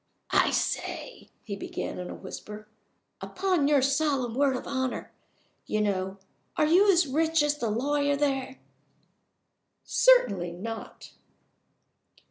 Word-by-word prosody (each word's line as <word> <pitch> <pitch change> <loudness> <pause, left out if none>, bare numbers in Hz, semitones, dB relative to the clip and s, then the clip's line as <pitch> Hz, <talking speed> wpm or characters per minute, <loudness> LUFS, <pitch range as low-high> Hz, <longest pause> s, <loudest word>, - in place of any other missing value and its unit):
"I - - +4
say!" - - -3
he 200 - -5
began, 195 - -5
in 180 - -6
a - - -6
whisper. 210 +2 -9 0.5
"Upon 365 -6 0
your 290 -3 +4
solemn 275 -3 +1
word 270 +1 +2
of - - -5
honor, 260 -2 -3 0.6
you 215 - -1
know 190 -2 -1 0.4
are - - +4
you 375 +6 +5
as 345 -3 +3
rich 320 +3 +1
as 295 0 0
the 235 - -1
lawyer 285 +5 +1
there?" 270 -2 -1 1.3
"Certainly 200 - +3
not." 225 +6 -8
270 Hz, 120 wpm, -27 LUFS, 215-300 Hz, 1.3 s, you